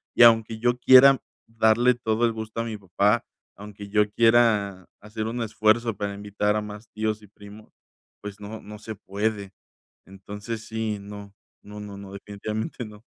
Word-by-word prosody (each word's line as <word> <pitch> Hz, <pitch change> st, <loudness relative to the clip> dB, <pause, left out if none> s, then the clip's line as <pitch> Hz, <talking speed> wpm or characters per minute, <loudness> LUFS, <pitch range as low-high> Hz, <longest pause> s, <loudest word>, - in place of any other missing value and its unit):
Y -, -, +7 dB
aunque 115 Hz, -1 st, +5 dB
yo 120 Hz, +1 st, +1 dB
quiera 130 Hz, +1 st, +7 dB, 0.3 s
darle 115 Hz, +2 st, +3 dB
todo 115 Hz, -1 st, 0 dB
el 115 Hz, -, +1 dB
gusto 110 Hz, 0 st, -6 dB
a -, -, -2 dB
mi 110 Hz, -2 st, -5 dB
papá, 100 Hz, +4 st, +1 dB, 0.3 s
aunque 105 Hz, 0 st, -10 dB
yo 105 Hz, 0 st, +2 dB
quiera, 110 Hz, -5 st, +3 dB
hacer 110 Hz, +1 st, -5 dB
un 120 Hz, +2 st, -3 dB
esfuerzo, 110 Hz, +1 st, +1 dB
para 100 Hz, 0 st, -3 dB
invitar 105 Hz, +1 st, -1 dB
a 105 Hz, -, -1 dB
más 105 Hz, +1 st, -9 dB
tíos 110 Hz, 0 st, -2 dB
y 105 Hz, -, -15 dB
primos, 105 Hz, +1 st, -14 dB, 0.5 s
pues 105 Hz, 0 st, -8 dB
no, 105 Hz, +2 st, -7 dB
no 105 Hz, 0 st, -10 dB
se 110 Hz, +1 st, -7 dB
puede. 100 Hz, 0 st, -3 dB, 0.5 s
Entonces 105 Hz, +4 st, -7 dB
sí, 110 Hz, -1 st, -3 dB
no. 100 Hz, 0 st, -10 dB, 0.3 s
No, 105 Hz, 0 st, -10 dB
no, 105 Hz, -1 st, -8 dB
no. 100 Hz, -1 st, -10 dB
Definitivamente, 105 Hz, +4 st, -5 dB
no. 105 Hz, 0 st, -13 dB
105 Hz, 170 wpm, -25 LUFS, 105-115 Hz, 0.5 s, Y